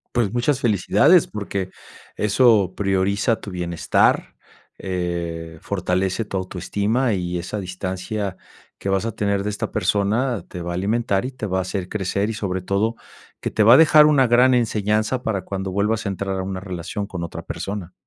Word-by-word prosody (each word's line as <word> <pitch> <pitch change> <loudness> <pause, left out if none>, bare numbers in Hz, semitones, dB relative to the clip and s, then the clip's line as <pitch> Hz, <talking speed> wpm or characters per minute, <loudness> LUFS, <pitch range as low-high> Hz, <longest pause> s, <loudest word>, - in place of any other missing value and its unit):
Pues 115 -5 +1
muchas 125 +4 +1
felicidades 110 - +4
porque 100 -3 -4 0.5
eso 105 -3 +3
prioriza 100 +3 +1
tu 100 - -7
bienestar, 85 -2 +1 0.4
eh, 85 -3 -4
fortalece 95 +1 -1
tu 100 -2 -4
autoestima 100 +7 -1
y 90 -2 -2
esa 95 +5 -4
distancia 95 +2 -4 0.4
que 100 - -4
vas 95 +3 +1
a 115 - -3
tener 100 -1 0
de 105 - -2
esta 105 - -4
persona 105 +1 0
te 90 - -7
va 85 0 -4
a - - -3
alimentar 100 +2 0
y 130 - -4
te 120 -5 -5
va 95 - -1
a 95 - +1
hacer 95 -1 -4
crecer 100 0 -1
y 115 - -3
sobre 95 -4 -2
todo 100 +5 0 0.5
que - - -2
te 110 - +2
va 115 +3 +8
a - - +9
dejar 155 -1 +7
una 145 -4 +4
gran 125 +2 +5
enseñanza 110 +1 +1
para 100 -4 -2
cuando 95 -1 -4
vuelvas 105 +3 0
a 100 - 0
entrar 95 0 -3
a 95 - -2
una 95 0 -4
relación 95 +2 -5
con 90 -3 -5
otra 85 - -6
persona. 95 -3 -5
100 Hz, 180 wpm, -22 LUFS, 95-110 Hz, 0.5 s, a